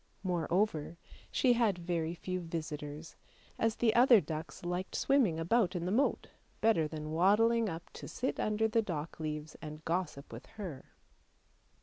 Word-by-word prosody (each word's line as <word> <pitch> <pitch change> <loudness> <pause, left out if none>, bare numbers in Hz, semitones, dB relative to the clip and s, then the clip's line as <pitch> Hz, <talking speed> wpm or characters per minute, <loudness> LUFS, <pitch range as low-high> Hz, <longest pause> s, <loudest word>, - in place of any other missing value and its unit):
Moreover, 175 -2 0 0.3
she 250 -2 +3
had 230 -6 +2
very 170 -1 -2
few 185 +1 -3
visitors, 155 -2 -6 0.4
as 225 -1 +2
the 225 -2 +2
other 240 -1 +7
ducks 160 0 -6
liked 180 +1 -3
swimming 245 - +2
about 185 +3 +2
in 175 -1 -2
the 180 - -1
moat 260 +7 +1 0.3
better 215 -9 +3
than 155 0 -6
waddling 215 +6 +4
up 165 0 -6
to - - -8
sit 260 - -3
under 215 +1 +1
the 225 +1 +2
dock 165 -7 -5
leaves 155 0 -4
and 155 0 -8
gossip 165 -7 -2
with 115 - -9
her. 175 -11 -6
175 Hz, 150 wpm, -33 LUFS, 155-215 Hz, 0.4 s, other